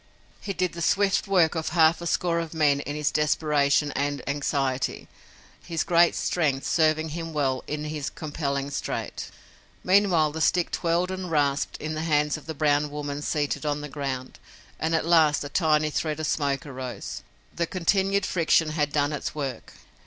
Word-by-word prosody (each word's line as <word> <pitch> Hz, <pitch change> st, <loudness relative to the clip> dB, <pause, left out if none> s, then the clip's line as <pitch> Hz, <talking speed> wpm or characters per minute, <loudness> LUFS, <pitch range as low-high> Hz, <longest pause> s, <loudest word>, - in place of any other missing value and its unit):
He 200 Hz, -, -5 dB
did 185 Hz, -1 st, -1 dB
the 170 Hz, -, -6 dB
swift 200 Hz, +4 st, +2 dB
work 180 Hz, -5 st, +3 dB
of 160 Hz, -2 st, -2 dB
half 165 Hz, 0 st, +4 dB
a 170 Hz, -, -4 dB
score 170 Hz, 0 st, +1 dB
of 165 Hz, -1 st, -5 dB
men 145 Hz, -3 st, +3 dB
in 145 Hz, +1 st, -5 dB
his 150 Hz, -1 st, 0 dB
desperation 150 Hz, -1 st, +2 dB
and 145 Hz, 0 st, -2 dB
anxiety, 140 Hz, -2 st, -1 dB, 0.6 s
his 165 Hz, -2 st, -2 dB
great 170 Hz, 0 st, +4 dB
strength 145 Hz, -6 st, 0 dB
serving 155 Hz, -1 st, +2 dB
him 165 Hz, +1 st, -5 dB
well 135 Hz, -4 st, 0 dB
in 150 Hz, 0 st, -3 dB
his 150 Hz, -1 st, -4 dB
compelling 140 Hz, -2 st, -3 dB
strait. -, -, -4 dB, 0.5 s
Meanwhile 180 Hz, -5 st, +3 dB
the 160 Hz, +1 st, -5 dB
stick 175 Hz, +2 st, +2 dB
twirled 175 Hz, +2 st, 0 dB
and 185 Hz, -1 st, -4 dB
rasped 145 Hz, -3 st, 0 dB
in 155 Hz, +1 st, -4 dB
the 155 Hz, -, -3 dB
hands 150 Hz, -2 st, +1 dB
of 155 Hz, -, -10 dB
the 160 Hz, -, -5 dB
brown 145 Hz, 0 st, +2 dB
woman 145 Hz, 0 st, -5 dB
seated 150 Hz, 0 st, -1 dB
on 145 Hz, -1 st, -1 dB
the 150 Hz, -, -6 dB
ground, 135 Hz, -3 st, -5 dB, 0.4 s
and 160 Hz, +1 st, 0 dB
at 160 Hz, -, 0 dB
last 160 Hz, -4 st, +4 dB
a 145 Hz, -, -6 dB
tiny 155 Hz, -1 st, +2 dB
thread 155 Hz, 0 st, -2 dB
of 155 Hz, -, -2 dB
smoke 140 Hz, -2 st, -1 dB
arose. 130 Hz, -3 st, -6 dB, 0.3 s
The 170 Hz, -1 st, -1 dB
continued 190 Hz, +3 st, +1 dB
friction 165 Hz, -3 st, +2 dB
had 150 Hz, -2 st, 0 dB
done 145 Hz, 0 st, +1 dB
its 145 Hz, -, -4 dB
work. 135 Hz, -5 st, -5 dB
155 Hz, 175 wpm, -26 LUFS, 145-165 Hz, 0.6 s, half